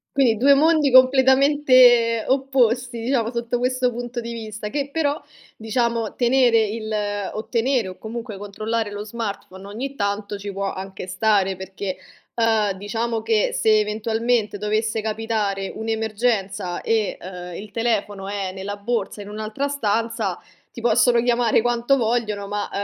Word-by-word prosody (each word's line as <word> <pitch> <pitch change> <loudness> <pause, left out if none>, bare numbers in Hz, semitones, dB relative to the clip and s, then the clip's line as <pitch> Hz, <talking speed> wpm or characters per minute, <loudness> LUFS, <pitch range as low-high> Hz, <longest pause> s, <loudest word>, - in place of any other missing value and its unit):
Quindi 255 -5 +3
2 275 +6 +5
mondi 305 -1 +3
completamente 255 -3 +5
opposti 255 -3 +1
diciamo 235 -1 0
sotto 235 0 -2
questo 250 0 +1
punto 240 0 -5
di 235 0 -6
vista. 215 -2 -6
Che 280 +3 -2
però 300 -1 0 0.4
diciamo 230 0 -1
tenere 245 -2 +4
il 215 +1 -4 0.4
o 215 - -6
tenere, 240 -2 +1
o 185 - -9
comunque 225 -2 -7
controllare 215 +2 -3
lo 205 0 -5
smartphone 205 -4 -6
ogni 255 +7 -6
tanto 205 -1 -2
ci 200 0 -6
può 195 0 -2
anche 190 -1 -7
stare, 195 0 +1
perché, 190 0 -5 0.4
ehm, 220 -4 +1
diciamo 225 +3 -3
che 220 -1 +1
se 215 -1 +3
eventualmente 220 0 0
dovesse 215 +2 -1
capitare 215 -3 -2
un'emergenza 220 -4 -1
e, 220 -2 0
ehm, 180 -1 -8
il 205 0 -9
telefono 210 -4 -1
è 200 -2 -3
nella 195 +2 -5
borsa 210 0 -3
in 200 - -8
un'altra 215 +6 -3
stanza, 230 -4 -1 0.3
ti 235 - -10
possono 240 +1 +4
chiamare 240 -2 +3
quanto 240 +3 +1
vogliono 220 -4 -1
ma, 205 +1 -3
225 Hz, 140 wpm, -22 LUFS, 205-245 Hz, 0.4 s, 2